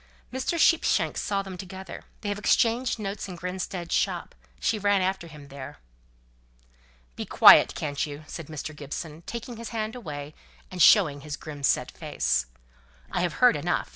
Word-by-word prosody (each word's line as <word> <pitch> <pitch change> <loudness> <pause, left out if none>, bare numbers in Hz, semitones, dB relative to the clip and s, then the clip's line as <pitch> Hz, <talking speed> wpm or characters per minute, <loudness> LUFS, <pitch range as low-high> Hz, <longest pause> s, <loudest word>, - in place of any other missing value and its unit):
"Mr. 260 +6 -1
Sheepshanks 330 0 +3
saw 200 -1 -1
them 190 -2 -8
together. 190 0 -8 0.2
They 205 - -3
have 205 0 -2
exchanged 235 +4 +2
notes 200 -1 -4
in 185 - -7
Grinstead's 180 0 -4
shop; - - 0 0.3
she 215 - 0
ran 205 -1 +2
after 190 -2 -2
him 150 -3 -13
there." 135 -1 -9 1.4
"Be - - -4
quiet, - - +7
can't 145 -2 -2
you?" 145 0 -6
said 160 0 -8
Mr. 155 0 -6
Gibson, 150 +2 -7
taking 235 0 -6
his 230 0 -7
hand 220 -1 -3
away, 150 - -7 0.4
and 180 -1 -3
showing 155 -10 +6
his 150 0 -6
grim 150 -3 -9
set 135 - +1
face. - - -1 0.6
"I've - - 0
heard - - +5
enough. - - -1
185 Hz, 160 wpm, -26 LUFS, 150-210 Hz, 1.4 s, quiet